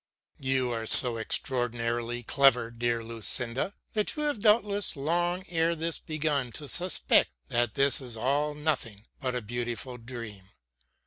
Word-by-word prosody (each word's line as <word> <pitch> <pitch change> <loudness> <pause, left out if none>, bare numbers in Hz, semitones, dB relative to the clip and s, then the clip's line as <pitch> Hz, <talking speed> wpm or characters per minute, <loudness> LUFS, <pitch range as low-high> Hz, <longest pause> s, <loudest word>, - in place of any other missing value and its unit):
You 130 -2 0
are 115 -1 -3
so 120 0 +8
extraordinarily 120 0 -1
clever, 125 -2 +3
dearest 115 -1 -2
Lucinda, 115 - -3 0.2
that 210 -1 0
you 300 - -3
have 290 -6 -1
doubtless 210 -2 +2
long 175 +5 -1
ere 165 0 +1
this 165 +1 -1
begun 150 -5 -2
to 150 - -6
suspect 180 +5 +2 0.2
that 120 -2 0
this 140 0 +2
is 120 -3 -5
all 145 +5 0
nothing 120 -9 -3
but 130 -2 -2
a 125 - -3
beautiful 120 +2 -5
dream. 115 -5 -9
130 Hz, 140 wpm, -28 LUFS, 115-155 Hz, 0.2 s, so